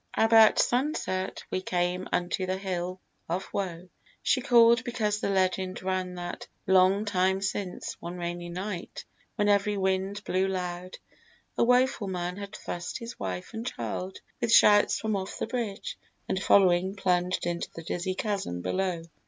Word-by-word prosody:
About 225 -1 +6
sunset 245 - 0
We 185 - -1
came 180 0 -1
unto 180 +1 -1
the 185 0 -1
hill 185 -1 -3 0.3
of 180 +3 -2
woe, 180 -2 -3 0.4
so 255 - +2
call'd 235 -2 +6
Because 220 -4 -1
the - - -1
legend 185 -1 0
ran 185 -1 -2
that, 175 0 -6 0.2
long 190 +2 +4
time 190 -1 +2
since, 195 -1 -3
One 175 +1 -6
rainy 175 0 -4
night, 185 +1 -5 0.3
when 205 -2 +1
every 205 0 +2
wind 190 +1 -1
blew 185 +1 +1
loud, 180 -1 -4 0.6
A - - +3
woful 250 -3 +3
man 180 -1 -3
had 200 -1 -7
thrust 175 0 -5
his 235 -1 -8
wife 90 -2 -5
and 225 0 -4
child 185 - -4 0.2
With 225 - +1
shouts 205 -2 +6
from 220 -1 -1
off 190 0 -4
the - - -2
bridge, 225 -4 -4 0.3
and 190 - -1
following, 190 -1 +4
plunged 180 -2 0
Into 175 0 -2
the 165 - -7
dizzy 175 +3 -2
chasm 190 - -2
below. 185 -3 -1
190 Hz, 155 wpm, -28 LUFS, 180-205 Hz, 0.6 s, About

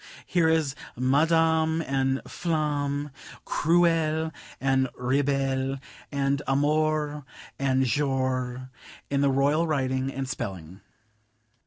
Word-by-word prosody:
Here 170 -3 +2
is 160 -4 +2 0.2
'Madame' 160 +4 +2
and 135 -1 0
'Flamme,' 145 -3 -1 0.3
'Cruelle' 160 -1 +2 0.3
and 135 -1 +2
'Rebelle,' 135 0 0 0.3
and 140 0 0
'Amour' 150 +1 +1 0.4
and 130 -1 +2
'Jour' 130 -1 -1 0.4
in 140 0 +2
the 140 - +4
Royal 145 +5 +2
writing 130 -3 0
and 135 0 -4
spelling. 95 -6 -6
140 Hz, 95 wpm, -26 LUFS, 130-155 Hz, 0.4 s, the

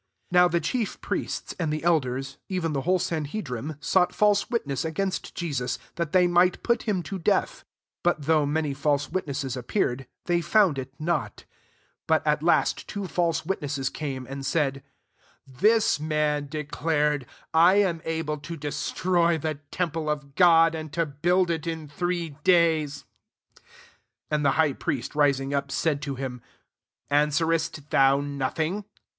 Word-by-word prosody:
59 180 0 +6
Now - - +6
the 170 0 +1
chief 210 +8 -2
priests, - - -3
[and 160 -3 0
the 155 +1 -3
eiders] 135 -4 0
even 175 -5 -1
the 135 - -1
whole 185 +6 +2
sanhedrim 155 - -3
sought 180 +3 +2
false 205 -1 +3
witness 145 - -1
against 185 +4 -3
Jesus, 140 -8 -2 0.2
that 170 -2 -3
they 180 0 +5
might 175 +1 +3
put 235 0 0
him 185 -4 0
to 195 +1 -5
death; 165 - +2
60 - - -21 0.4
but 175 -3 +1
[though 155 0 +3
many 150 0 0
false 145 0 0
witnesses 140 -7 -2
appear^] 125 - -1 0.2
they 175 -1 +1
found 175 -2 +3
tV 130 -1 -4
not 170 +3 -2 0.6
But - - +2
at - - +2
last - - +2
two 200 -2 -4
false 170 -3 0
witnesses 145 -7 -2
came, 135 -4 -4
61 130 - -12
and 135 0 -6
said, 135 -2 0 0.4
" - - -34 0.2
This 220 -7 +4
roan 150 -1 0
declared, 150 -2 -1 0.2
< - - -58
I 170 +4 +6
am 185 -5 +2
able 160 -2 -2
to 165 +3 -7
destroy 170 +3 0
the 155 -1 -3
tem 180 -3 -1
ple 160 -1 -3
of 145 -2 -3
God, 165 -1 +6
and 155 -2 -6
to 165 0 +1
build 175 +5 +1
it 165 -1 -3
in 160 -2 -4
three 175 +2 -2
days.* 160 -5 +3 0.3
" - - -51
62 - - -25 0.7
And 150 -1 +1
the 140 - +4
high 155 -3 +3
priest, 130 -1 -3
rising 140 -2 +2
up, 140 0 -1
said 145 0 0
to 140 -2 -4
him, 125 -2 -5 0.7
•*Answerest 150 +1 +1
thou 135 0 +5
nothing? 145 +7 -2
155 Hz, 165 wpm, -26 LUFS, 140-175 Hz, 0.7 s, 59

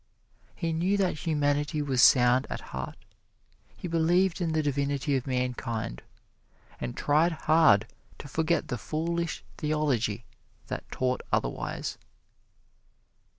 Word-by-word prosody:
He 165 -2 -2
knew 180 +5 +1
that 180 -5 -1
humanity 145 -1 +1
was 135 -4 +1
sound 125 0 +6
at - - -4
heart; 65 -1 -5 0.8
he - - -5
believed 175 +3 +2
in 165 -2 0
the 155 -1 +1
divinity 140 0 0
of 130 -1 -2
mankind, 120 - -2 0.8
and - - -5
tried 155 +4 +3
hard 155 -11 +5 0.3
to - - -9
forget 160 +5 0
the 125 - -2
foolish 170 +4 -2
theology 135 -8 0 0.4
that - - -5
taught 130 0 -1
otherwise. - - -2
145 Hz, 115 wpm, -28 LUFS, 125-165 Hz, 0.8 s, sound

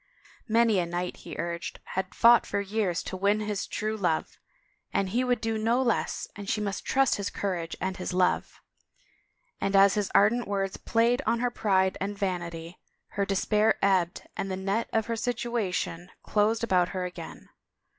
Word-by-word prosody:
Many 225 -3 +3
a 175 - -1
knight, 175 +1 -3
he - - -9
urged, 170 +2 -4
had 190 0 -3
fought 235 +1 +6
for - - -1
years 200 -3 -1
to - - -5
win 200 +3 +2
his 210 -2 -3
true 215 +1 -2
love 175 -6 -1 0.5
and 195 -1 0
he 240 +6 +1
would 250 -2 +1
do 225 0 -1
no 230 +3 +2
less 245 -4 0
and 200 -1 -7
she - - +1
must 200 -2 -3
trust 270 0 +2
his 200 -1 -2
courage 175 -5 -3
and 190 0 -2
his 180 - -4
love, 180 0 +1 1.0
and 195 - 0
as 195 0 +7
his 210 -2 -1
ardent 235 +4 +4
words 195 -1 -1
played 235 +3 +1
on 235 - +2
her 245 0 0
pride 190 -5 +1
and 200 +1 -3
vanity 175 -3 -4 0.3
her 200 -1 -2
despair 210 +2 +2
ebbed 185 -3 +1
and 195 - -3
the 185 - -2
net 195 +4 -1
of 220 -1 +1
her 230 - -2
situation 225 -7 -2
closed 220 +2 +1
about 180 -5 +2
her 185 -1 -3
again. 175 -2 -9
200 Hz, 175 wpm, -28 LUFS, 185-225 Hz, 1.0 s, as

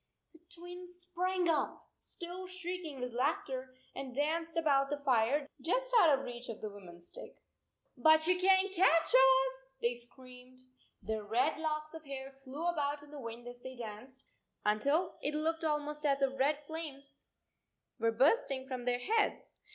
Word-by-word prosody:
The 325 - -18 0.2
Twins 355 +1 -8
sprang 360 0 0
up, 315 -3 0
still 355 +2 -7
shrieking 360 -6 -5
with 250 -1 -3
laughter, 255 +1 -1 0.2
and 260 -2 -6
danced 325 +4 -1
about 275 -4 +3
the 290 - -1
fire 275 +1 +2
just - - 0
out 315 -8 +6
of 270 - -6
reach 240 0 -7
of 225 - -5
the 215 - -5
woman 185 -4 -12
s 175 0 -9
stick. - - -9 0.3
" - - -47
But 315 0 +7
you 365 +2 +4
can 380 +1 +5
t - - -12
catch 330 -3 +5
us," 265 0 +4
they 235 0 +1
screamed. 250 +1 -11 0.4
Their 220 -1 -2
red 245 +9 +1
locks 310 -1 -2
of 320 -1 -8
hair 270 -1 -6
flew 285 +5 -5
about 295 -4 0
in 295 - -15
the 290 -2 -8
wind 235 0 -7
as 245 0 -9
they 260 +1 -8
danced, 240 +3 -8 0.4
until 280 - +1
it 295 +1 -1
looked 325 +2 0
almost 300 -1 -1
as 275 -2 +2
if 270 -1 +2
red 285 +2 +3
flames 285 -3 -7 0.7
were 230 0 +3
bursting 265 - +2
from 255 -2 -5
their 245 0 +2
heads. 435 - 0
280 Hz, 175 wpm, -34 LUFS, 255-325 Hz, 0.7 s, But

